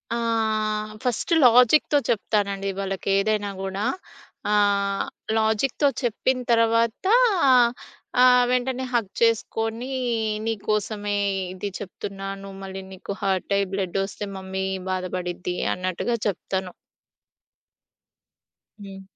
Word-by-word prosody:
ఆహ్, 215 -2 0
ఫస్ట్ 250 +5 -1
లాజిక్‌తో 250 +5 +6
చెప్తానండి 200 -3 0
వాళ్ళకేదైనా 195 +2 0
గూడా. 195 +1 -3 0.7
ఆహ్, 200 -1 +2 0.3
లాజిక్‌తో 220 +6 +2 0.2
చెప్పిన 255 +2 0
తర్వాత 230 +3 +2 1.2
ఆహ్, 250 0 +7
వెంటనే 255 +1 0
హగ్ 225 -5 0
చేసుకొని 230 +2 0 0.5
నీకోసమే 210 -1 -1 0.4
ఇది 195 +2 -4
చెప్తున్నాను. 195 0 -7
మళ్ళీ 190 0 -6
నీకు 190 +1 -8
హార్ట్ 195 0 0
అయ్యి 200 -1 0
బ్లడ్డొస్తే 195 +2 -2
మమ్మీ 190 0 -4 0.3
బాధపడిద్ది 180 -1 -3 0.2
అన్నట్టుగా 185 +6 -2
చెప్తాను. 190 -1 -3 2.1
హ్మ్. 195 -1 -9
205 Hz, 85 wpm, -24 LUFS, 195-230 Hz, 2.1 s, ఆహ్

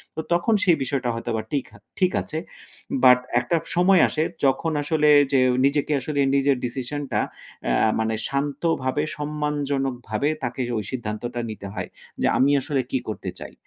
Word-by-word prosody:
তো - - -4
তখন 175 +6 +2
সেই 175 -3 +5
বিষয়টা 130 -2 -1
হয়তোবা 115 -1 -2
টিক 140 -3 -1
হা - - -15 0.2
ঠিক 185 -1 +3
আছে। 155 - -6 0.7
বাট 125 0 +8 0.2
একটা 120 +7 -1 0.2
সময় 180 0 +5
আসে 155 - 0 0.2
যখন 140 +4 +2
আসলে 150 0 +2 0.2
যে 135 - +5 0.3
নিজেকে 145 +2 +1
আসলে 145 +2 -3 0.2
নিজের 140 -1 +3
ডিসিশনটা 135 +3 -3 0.5
অ্যা - - +2 0.2
মানে 110 0 0
শান্তভাবে 140 0 -1
সম্মানজনকভাবে 145 -4 -2
তাকে 125 +1 -3 0.2
ওই 105 - -2
সিদ্ধান্তটা 120 -1 -4
নিতে 105 -2 -7
হয়। - - -5 0.3
যে - - +3
আমি 135 +2 +4
আসলে 140 -1 -1
কি 130 - +1
করতে 110 - -4
চাই? - - -9
140 Hz, 155 wpm, -24 LUFS, 125-150 Hz, 0.7 s, বাট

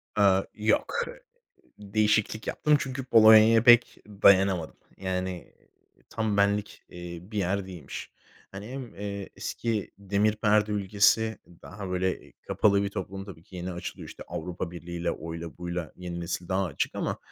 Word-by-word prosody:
Aaa, 95 -2 +4
yok. 110 0 0
Hı - - -10 0.6
değişiklik 105 +1 0
yaptım 150 -1 +2
çünkü 130 0 -4
Polonya'ya 110 -1 +7
pek 120 0 +6
dayanamadım. 95 -4 +3 0.2
Yani, 95 -1 -4 0.4
iii, - - -29
tam 110 -2 -1
benlik, 100 0 0
eee, 85 -1 -8
bir 105 +3 -6
yer 95 +1 -1
değilmiş. 90 -7 -8 0.4
Hani 100 +2 -8
hem, 130 -2 -7
eee, 100 -1 -5
eski 115 -4 -3
Demir 100 +2 +1
Perde 105 0 +2
ülkesi 105 +2 +2 0.2
daha 100 0 -8
böyle 90 0 -2
kapalı 100 -1 +3
bir 100 - -1
toplum 95 -1 -6
tabii 90 -5 -11
ki 95 0 -13
yeni 90 +1 -4
açılıyor 85 - -7
işte - - -10
Avrupa 90 +1 -5
Birliği'yle, 85 0 -4
oyla, 85 0 -7
buyla 85 -2 -4
yeni 90 -1 -6
nesil 85 +1 -4
daha 95 +1 +1
açık 80 -7 -2
ama, - - -2
100 Hz, 150 wpm, -27 LUFS, 90-105 Hz, 0.6 s, Polonya'ya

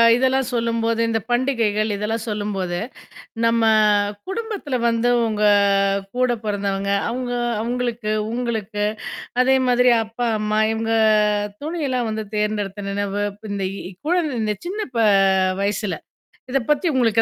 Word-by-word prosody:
இதெல்லாம் 260 +1 +1
சொல்லும்போது, 230 -1 0
இந்த 225 - +1
பண்டிகைகள் 230 -4 +1
இதெல்லாம் 215 +2 -2
சொல்லும்போது, 195 -4 -2 0.7
நம்ம 230 0 +3 0.7
குடும்பத்துல 400 - -3
வந்து 230 +1 +1 0.2
உங்க 215 -1 -2 0.7
கூட 255 0 +2
பொறந்தவங்க, 200 -1 -1 0.2
அவங்க 245 +1 -3 0.3
அவங்களுக்கு, 240 -2 -2 0.2
உங்களுக்கு, 220 -4 -2 0.6
அதே 265 +1 +4
மாதிரி 250 0 +4
அப்பா, 230 +2 -3
அம்மா, 215 0 0
இவங்க 225 0 -2 0.7
துணியெல்லாம் 280 -7 -2
வந்து 215 0 -3
தேர்ந்தெடுத்த 205 -1 -2
நினைவு. 205 0 -2
இப்ப 205 - -17
இந்த 195 -1 -2 0.2
இ - - -12
குழந்த 335 -5 +1
இந்த 210 -1 0
சின்ன 410 +4 -3 0.2
ப - - +2 0.6
வயசுல. 200 -4 -1 0.5
இத 275 - +2
பத்தி 300 +4 +1
உங்களுக்கு 230 -3 +3
225 Hz, 120 wpm, -21 LUFS, 210-250 Hz, 0.7 s, அதே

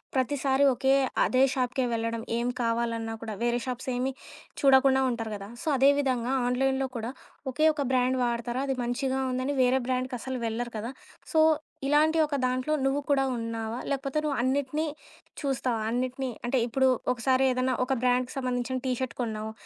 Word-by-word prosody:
ప్రతిసారి 270 +1 +2
ఒకే 265 +2 +2 0.3
అదే 255 +1 +3
షాప్‌కే 255 0 0
వెళ్ళడం, 230 0 -2 0.2
ఏం 240 +1 0
కావాలన్నా 230 -1 -1
కూడా 220 -2 -5
వేరే 240 0 +1
షాప్స్ 255 +1 -4
ఏమి 260 +2 -1 0.5
చూడకుండా 265 -1 +5
ఉంటారు 225 -2 -4
గదా! 200 0 -8
సో - - -8
అదే 270 +2 +6
విధంగా 255 -2 0
ఆన్‌లైన్‌లో 265 +1 +1
కూడా 230 +2 -4 0.4
ఒకే 310 +5 +1
ఒక 295 - -2
బ్రాండ్ 255 0 +2
వాడతారా? 240 +2 -2
అది 270 - 0
మంచిగా 260 +2 -1
ఉందని 255 +3 -1
వేరే 255 +1 +3
బ్రాండ్‌కసలు 255 0 -2
వెళ్లరు 235 +2 -3
కదా! 225 +4 -4 0.4
సో 320 - +4 0.5
ఇలాంటి 310 +3 +4
ఒక 290 - -2
దాంట్లో 255 +4 0
నువ్వు 275 +2 +1
కూడా 275 -1 +3
ఉన్నావా? 230 0 -4
లేకపోతే 275 +1 -2
నువ్వు 290 -3 -1
అన్నిటిని 280 +4 0 0.5
చూస్తావా? 260 -4 -1
అన్నిటిని 255 +2 -2 0.2
అంటే 245 +2 +1
ఇప్పుడు 265 +3 +2 0.3
ఒకసారి 260 +2 +2
ఏదైనా 255 +1 +1
ఒక 270 - 0
బ్రాండ్‌కి 250 0 +1
సంబంధించిన 255 0 -1
టీ - - +1
షర్ట్ 260 -1 -3
కొన్నావు. 220 -2 -3
255 Hz, 160 wpm, -28 LUFS, 240-270 Hz, 0.5 s, అదే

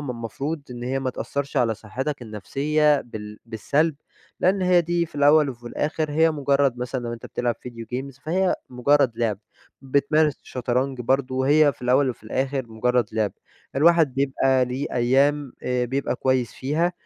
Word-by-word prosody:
ما 145 -3 -4
المفروض 135 +7 -4
إن 120 -1 -7
هي 130 +2 -1
ما 130 -1 -1
تأثرش 140 +3 -4
على 115 -3 +2
صحتك 130 +7 -5
النفسيّة 145 +7 +1
بال 105 -2 -9
بالسلب، 145 +8 0 0.5
لإن 185 +1 +2
هي 180 -1 +5
دي 170 0 0
في 155 - -24
الأوّل 145 0 +5
وفي 120 -1 -11
الآخر 155 +4 -2
هي 160 +2 +4
مجرّد 140 -3 +1
مثلًا 125 +1 -3
لو 120 - -3
أنت 115 - -8
بتلعب 120 -1 -1
ڤيديو 115 -1 -9
جيمز 130 +2 -5
فهي 180 +6 +1 0.2
مجرّد 130 0 +3
لعبة، 110 -4 0 0.4
بتمارس 140 +2 +2
شطرنج 125 +1 -2
برضو 130 +1 0
هي 145 +1 +5
في 125 - -19
الأوّل 130 +2 +3
وفي 120 - -11
الآخر 130 +3 -2
مجرّد 120 +1 +1
لعبة، 110 -2 0 0.4
الواحد 160 -2 +4
بيبقى 135 -1 +2
ليه 130 +4 -3
أيّام 135 +3 +2
آآ، 125 -1 0
بيبقى 135 +3 -2
كويّس 130 -3 0
فيها 155 +6 0
135 Hz, 165 wpm, -24 LUFS, 125-145 Hz, 0.5 s, هي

